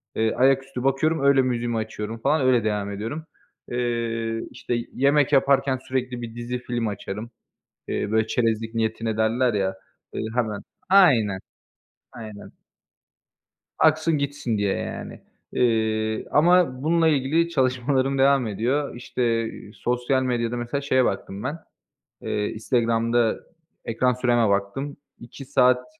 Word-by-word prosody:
eee, 110 Hz, 0 st, +1 dB
ayaküstü 135 Hz, -1 st, +1 dB
bakıyorum, 135 Hz, +3 st, +1 dB
öyle 140 Hz, -1 st, +5 dB
müziğimi 120 Hz, -2 st, -1 dB
açıyorum 110 Hz, 0 st, -4 dB
falan 145 Hz, +5 st, +2 dB
öyle 125 Hz, -3 st, +3 dB
devam 105 Hz, -1 st, -1 dB
ediyorum. 115 Hz, +11 st, -5 dB, 0.5 s
Eee, 115 Hz, -2 st, -1 dB
işte, 120 Hz, -, -3 dB, 0.2 s
yemek 140 Hz, +1 st, +3 dB
yaparken 135 Hz, -1 st, +3 dB
sürekli 125 Hz, -2 st, -2 dB
bir 115 Hz, -1 st, -7 dB
dizi 120 Hz, +1 st, -4 dB
film 120 Hz, -2 st, -2 dB
açarım. 105 Hz, +2 st, -5 dB, 0.6 s
Eee, 105 Hz, -, -2 dB
böyle, 110 Hz, 0 st, +2 dB
"çerezlik 115 Hz, -1 st, 0 dB
niyetine" 110 Hz, 0 st, -1 dB
derler 115 Hz, +2 st, +2 dB
ya, 95 Hz, -2 st, +1 dB, 0.5 s
ııı, -, -, -2 dB
hemen. 110 Hz, -4 st, -1 dB, 0.3 s
Aynen. 125 Hz, -, +5 dB, 0.7 s
Aynen. 110 Hz, -3 st, -10 dB, 1.3 s
Aksın 160 Hz, 0 st, +3 dB
gitsin 140 Hz, -5 st, -2 dB
diye 100 Hz, -1 st, 0 dB
yani. -, -, -6 dB, 0.3 s
Eee, 110 Hz, -2 st, +1 dB
ama 155 Hz, -4 st, +3 dB
bununla 165 Hz, +1 st, +3 dB
ilgili 155 Hz, +3 st, +2 dB
çalışmalarım 130 Hz, -1 st, +1 dB
devam 135 Hz, -2 st, +4 dB
ediyor. 120 Hz, +8 st, -1 dB
İşte, 115 Hz, -2 st, -1 dB, 0.2 s
sosyal 125 Hz, +3 st, 0 dB
medyada 120 Hz, -1 st, -1 dB
mesela 120 Hz, +4 st, -3 dB
şeye 130 Hz, -3 st, +2 dB
baktım 95 Hz, +1 st, -3 dB
ben, 145 Hz, +5 st, -3 dB, 0.6 s
eee, 105 Hz, 0 st, -2 dB
Instagram'da 115 Hz, 0 st, +1 dB, 0.5 s
ekran 125 Hz, +2 st, +1 dB
süreme 120 Hz, -3 st, +2 dB
baktım. 100 Hz, +9 st, -2 dB, 0.2 s
2 120 Hz, +3 st, -11 dB
saat 125 Hz, -1 st, +3 dB
120 Hz, 125 wpm, -24 LUFS, 110-135 Hz, 1.3 s, öyle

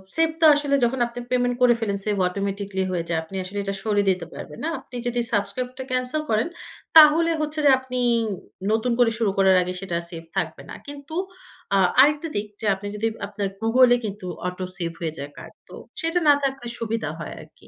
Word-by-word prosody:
Save 325 Hz, 0 st, +3 dB
তো 320 Hz, -, +7 dB
আসলে 285 Hz, -1 st, +1 dB
যখন 245 Hz, +2 st, +1 dB
আপনি 240 Hz, +1 st, -8 dB
পেমেন্ট 245 Hz, -1 st, +1 dB
করে 245 Hz, -1 st, +6 dB
ফেলেছে 200 Hz, -1 st, -2 dB, 0.2 s
অটোমেটিক্যালি 195 Hz, 0 st, -3 dB
হয়ে 175 Hz, -2 st, -1 dB
যায়। 165 Hz, -, +1 dB
আপনি 175 Hz, +4 st, -11 dB
আসলে 190 Hz, +2 st, -7 dB
এটা 195 Hz, 0 st, -2 dB
সরিয়ে 205 Hz, -2 st, +1 dB
দিতে 180 Hz, -2 st, 0 dB
পারবেন 150 Hz, -, -9 dB
না 320 Hz, -, 0 dB
আপনি 250 Hz, -, -14 dB
যদি 245 Hz, 0 st, -1 dB
সাবস্ক্রাইবটা 250 Hz, +5 st, -2 dB
ক্যানসেল 255 Hz, +4 st, 0 dB
করেন, 220 Hz, +5 st, +2 dB, 0.5 s
তাহলে 320 Hz, +2 st, +8 dB
হচ্ছে 305 Hz, 0 st, -2 dB
যে -, -, +7 dB
আপনি 255 Hz, -1 st, -4 dB, 0.7 s
নতুন 225 Hz, +3 st, +1 dB
করে 240 Hz, -2 st, +5 dB
শুরু 220 Hz, -4 st, +1 dB
করার 190 Hz, -1 st, +5 dB
আগে 180 Hz, 0 st, -3 dB
সেটা 175 Hz, -3 st, -2 dB
সেভ 165 Hz, -2 st, -8 dB
থাকবে 160 Hz, -4 st, -2 dB
না। -, -, -7 dB
কিন্তু 285 Hz, +2 st, -8 dB, 0.6 s
আ -, -, +5 dB, 0.2 s
আরেকটা 295 Hz, +3 st, +3 dB
দিক 205 Hz, +1 st, -1 dB
যে 220 Hz, -, -4 dB
আপনি 205 Hz, +1 st, -8 dB
যদি 220 Hz, +2 st, 0 dB, 0.2 s
আপনার 200 Hz, -1 st, -3 dB
গুগলে 245 Hz, +2 st, +5 dB
কিন্তু 205 Hz, -2 st, -6 dB, 0.2 s
অটো 180 Hz, +1 st, -4 dB
সেভ 170 Hz, -2 st, -3 dB
হয়ে 160 Hz, -2 st, -2 dB
যায় 140 Hz, +1 st, -6 dB
কার্ড -, -, -11 dB, 0.2 s
তো -, -, -10 dB, 0.3 s
সেটা 330 Hz, +2 st, +1 dB
না 290 Hz, -, +9 dB
থাকলে 270 Hz, -3 st, -2 dB
সুবিধা 225 Hz, 0 st, -2 dB
হয় -, -, -6 dB
আরকি। -, -, -18 dB
225 Hz, 195 wpm, -24 LUFS, 195-260 Hz, 0.7 s, না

